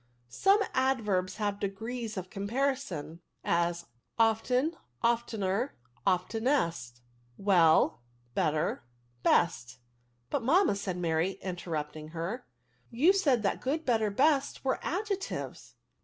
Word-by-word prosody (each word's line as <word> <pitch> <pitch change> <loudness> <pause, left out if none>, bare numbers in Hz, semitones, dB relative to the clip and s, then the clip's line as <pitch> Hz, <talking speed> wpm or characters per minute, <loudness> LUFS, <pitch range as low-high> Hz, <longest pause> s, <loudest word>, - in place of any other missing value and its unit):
Some 395 - +3
adverbs 215 -9 +1
have 205 -2 -2
degrees 220 +3 -4
of 185 -1 -5
comparison; 200 - -2 0.2
as, 170 0 0 0.3
often, 250 +7 +2 0.3
oftener, 230 0 0 0.3
oftenest; 180 - 0 0.4
well, 165 -6 +4 0.3
better, 155 -1 0 0.4
best. 120 -7 +3
'^ 125 +1 -13 0.5
But, - - 0
maniTna," 330 - +4
said 190 -3 -3
Mary, 170 +1 0
interrupting 155 -4 -4
ADVERBS. 160 - -14
83 - - -4
her, 210 +10 -3 0.2
" - - -38 0.2
you 375 - +8
said 280 - +2
that 200 - 0
good| 310 +5 -1
better, 220 -4 +2
best, 275 +6 +1
were 260 - +1
adjectives." 395 +2 -4
205 Hz, 115 wpm, -30 LUFS, 170-260 Hz, 0.5 s, you